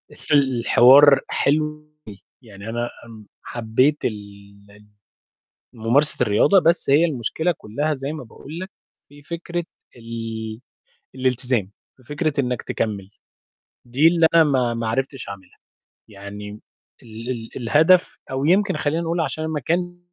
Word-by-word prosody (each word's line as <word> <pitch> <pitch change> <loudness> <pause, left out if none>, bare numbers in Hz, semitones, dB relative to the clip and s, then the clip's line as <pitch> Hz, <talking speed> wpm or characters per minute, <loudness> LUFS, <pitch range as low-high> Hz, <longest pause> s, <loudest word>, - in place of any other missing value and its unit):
في 150 - -4
الحوار 135 +1 +6
حلو 150 +2 +1
أوي 150 0 -22 0.5
ويعني 100 -1 -10
أنا 120 +1 -3 0.2
امم 110 -3 -13 0.2
حبّيت 120 +6 0
ال 110 - 0 0.6
ال 105 +1 -19 0.9
ممارسة 125 +4 +2
الرياضة، 125 - +4
بس 170 -4 +1
هي 150 +5 +5
المشكلة 160 +4 -1
كلّها 145 +9 -2
زي 135 +1 -5
ما 155 - -7
باقول 145 +8 -11
لك، 185 +1 -7 0.4
في 145 0 -16
فكرة 170 +2 -5 0.3
ال 115 -1 -6 0.6
الالتزام، 125 -5 -1 0.3
في 130 - -23
فكرة 145 +1 -1
إنّك 125 -2 -2
تكمّل، 100 -3 -4 0.8
دي 135 +7 +3
اللي 165 -1 +4
أنا 165 -1 +7
ما 130 -5 +1
ما 115 -1 -3
عرفتش 135 0 -3
أعملها، 95 -2 -11 0.5
يعني 105 0 -9 0.5
ال 115 +2 -8
ال 115 -2 -5
الهدف، 155 +9 +3
أو 135 +1 -2
يمكن 190 +4 +2
خلّينا 160 +3 -1
نقول 165 +1 -2
عشان 155 0 -2
المكان 170 +4 -2
130 Hz, 135 wpm, -21 LUFS, 115-155 Hz, 0.9 s, أنا